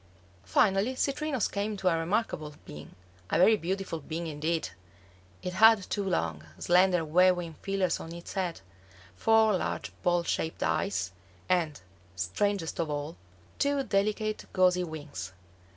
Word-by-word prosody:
Finally 195 - +2
Citrinus 275 -2 0
came 205 +1 -3
to 190 - -2
a 175 - +4
remarkable 165 -3 -1
being, 75 0 -10 0.3
a - - +1
very 215 +5 +6
beautiful 190 -2 -3
being 160 +3 -5
indeed. 160 - -2 0.7
It 180 - -3
had 220 0 +6
two 205 - 0
long, 85 - -1
slender, 180 -1 +3
waving 175 +1 +3
feelers 195 -3 0
on 165 - -8
its 170 0 -8
head, 185 -4 -2 0.5
four 220 - +4
large - - -3
ball 175 -1 +2
shaped 160 -1 -2
eyes, 95 +3 0 0.4
and, 165 -5 +1 0.4
strangest 165 - -1
of 165 -2 0
all, 145 +2 -3 0.4
two 280 -1 +1
delicate 215 0 0
gauzy 180 -1 +3
wings. 150 - -7
180 Hz, 135 wpm, -29 LUFS, 160-200 Hz, 0.7 s, very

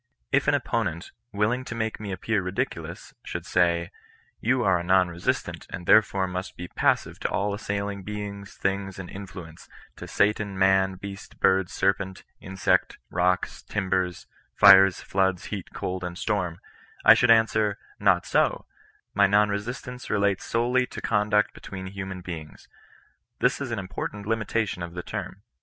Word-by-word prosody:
If - - +2
an - - +4
opponent, 90 -7 -2 0.2
will 105 +1 +1
ing 125 +1 -2
to 115 - -6
make 110 -1 -2
me 105 -2 -5
appear 100 +3 -1
ridiculous, 90 +1 -4
should - - -5
say 85 -1 +1 0.2
— - - -30
" - - -39
You 125 +2 +2
are 95 -4 +3
a - - -4
non 90 0 +4
resistant, 85 0 -2
and 90 - -7
therefore 100 -1 +4
must 90 0 -5
be 90 0 -7
passive - - +1
to - - -1
all 100 +1 0
assailing 100 -1 -3
beings, 100 0 -6
things, 95 0 -2
and 95 -2 -7
influences, 90 -4 -10 0.3
to - - -8
satan, 105 -1 +1
man, 95 0 +3
beast, 100 +1 -9
bird, 95 -1 +3
serpent, 95 -1 -1 0.2
insect, 95 0 0
rocks, 90 +1 0
timbers, 95 -3 -2 0.3
fires, 95 -1 +7
floods, 95 -2 0
heat, 95 -4 -5
cold, 90 0 -4
and 90 0 -5
storm," 90 -6 -1 0.2
— - - -24
I - - +11
should 120 +2 +2
answer, 110 -2 +4 0.2
not - - +3
so; - - +1 0.5
my 100 0 +5
non 105 +1 +4
resistance 120 +4 -5
relates 100 -2 +1
solely 125 +2 +1
to - - -8
conduct 105 -1 +2
between 95 -1 -8
h\mian 95 -1 -6
beings. 80 -4 -8 0.7
This - - +1
is 135 - -3
an 115 - -2
important 100 +1 -5
limitation 110 -3 -1
of 85 0 -6
the 90 - -4
term. - - -6
95 Hz, 165 wpm, -26 LUFS, 90-105 Hz, 0.7 s, I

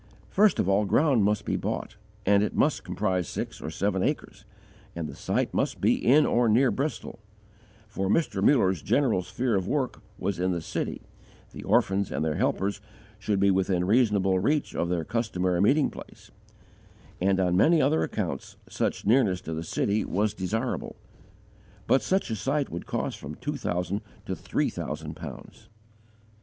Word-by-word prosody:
First 210 +1 +4
of - - +1
all, 100 +2 +3
ground 135 +1 +3
must 105 +1 +1
be - - -1
bought, - - -4 0.3
and 100 +1 +4
it 105 - -1
must 150 - +2
comprise 95 -2 -1
six - - -5
or - - -4
seven 95 +3 -1
acres, 140 -4 -3 0.5
and 85 -2 -3
the - - -8
site - - -1
must - - -1
be - - +3
in 145 +5 +4
or 120 -1 +2
near 120 +4 +4
Bristol; 130 -6 -3 0.7
for 95 -2 -3
Mr. 165 +9 +1
Muller's 95 - +3
general 125 -10 +2
sphere 120 +6 -2
of 95 -1 -1
work 135 -1 -1 0.2
was 95 -1 -2
in 90 0 +1
the 85 - -2
city, 80 - -4 0.5
the - - -9
orphans 95 0 +1
and 75 +4 -1
their 80 -1 -1
helpers 100 +1 0 0.4
should 100 -1 0
be 100 0 +4
within 95 -1 +1
reasonable 100 -4 +3
reach 145 +10 0
of 85 - -1
their 90 -2 0
customary 95 -5 0
meeting 140 +8 +3
place, - - -12 0.9
and 95 +1 +2
on 90 -1 +2
many 160 - +5
other 80 - +3
accounts 80 - -3
such - - -2
nearness 105 -5 +3
to 80 - -6
the 80 - -3
city 100 +5 0
was 105 +2 0
desirable. 110 +6 -3 0.9
But 130 - +3
such 190 -9 0
a - - 0
site 140 +6 -1
would 85 - -6
cost - - -3
from 75 +2 -7
two 145 +4 -4
thousand 90 +3 -2 0.2
to - - -3
three - - -1
thousand - - -5
pounds. - - -10
100 Hz, 170 wpm, -27 LUFS, 90-125 Hz, 0.9 s, many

